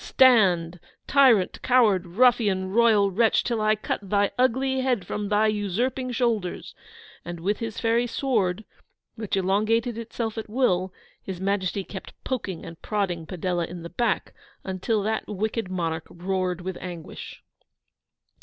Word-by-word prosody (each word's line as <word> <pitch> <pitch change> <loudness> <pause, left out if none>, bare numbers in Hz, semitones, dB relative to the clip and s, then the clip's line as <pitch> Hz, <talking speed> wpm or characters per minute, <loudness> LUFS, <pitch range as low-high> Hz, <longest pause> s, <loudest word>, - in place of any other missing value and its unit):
Stand, 185 -10 +4 0.3
tyrant, 255 -9 +4
coward, 215 -8 +3
ruffian, 200 -2 +2
royal 215 -3 +4
wretch, 225 +3 +3
till 235 -2 -1
I 215 0 +3
cut 215 - -3
thy 200 0 +1
ugly 260 +1 +1
head 250 -8 0
from 205 +2 -4
thy 210 +1 +3
usurping 220 +5 -1
shoulders!' 230 -7 -1 0.5
And, 175 0 -6
with 200 +5 -1
his 225 -2 -4
fairy 230 +1 +2
sword, 220 -6 0 0.5
which 215 -3 -3
elongated 215 +5 +1
itself 225 -1 -4
at 220 - -7
will, 190 -6 +1 0.3
His 190 -2 -6
Majesty 195 0 -1
kept 190 0 -9
poking 200 -10 -4
and 165 0 -10
prodding 180 -6 -2
Padella 175 -1 -2
in 175 -1 -8
the 170 - -8
back, 225 +2 -1 0.3
until 195 +3 -1
that 220 +1 -2
wicked 215 0 -2
monarch 165 -3 -3
roared 185 0 -2
with 185 0 -5
anguish. 175 -3 -8
205 Hz, 140 wpm, -25 LUFS, 185-230 Hz, 0.5 s, Stand